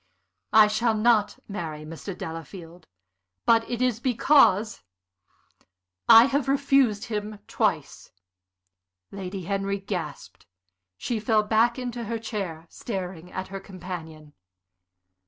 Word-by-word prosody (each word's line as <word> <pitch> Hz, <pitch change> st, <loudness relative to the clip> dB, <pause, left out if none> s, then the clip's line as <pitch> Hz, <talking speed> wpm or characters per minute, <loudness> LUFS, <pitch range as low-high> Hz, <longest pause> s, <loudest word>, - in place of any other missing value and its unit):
"I 215 Hz, -1 st, +8 dB
shall 220 Hz, +2 st, +1 dB
not 215 Hz, -1 st, +2 dB
marry 160 Hz, -6 st, -6 dB
Mr. 165 Hz, +4 st, -8 dB
Delafield. 165 Hz, +1 st, -9 dB, 0.6 s
But 225 Hz, -1 st, +3 dB
it 240 Hz, 0 st, -1 dB
is 245 Hz, -3 st, +1 dB
because 240 Hz, -4 st, +3 dB, 1.3 s
I 230 Hz, 0 st, +10 dB
have 275 Hz, 0 st, 0 dB
refused 275 Hz, -6 st, +2 dB
him 210 Hz, -2 st, -4 dB
twice." -, -, -2 dB, 1.0 s
Lady 190 Hz, -1 st, -6 dB
Henry 195 Hz, +2 st, -2 dB
gasped. 195 Hz, -1 st, -7 dB, 0.5 s
She 230 Hz, -, -3 dB
fell 215 Hz, 0 st, +2 dB
back 225 Hz, +3 st, +2 dB
into 245 Hz, -2 st, -5 dB
her 230 Hz, +1 st, -3 dB
chair, 195 Hz, -8 st, -5 dB
staring 180 Hz, -4 st, -6 dB
at 185 Hz, 0 st, -5 dB
her 195 Hz, 0 st, -6 dB
companion. 170 Hz, -6 st, -9 dB
210 Hz, 110 wpm, -25 LUFS, 185-230 Hz, 1.3 s, I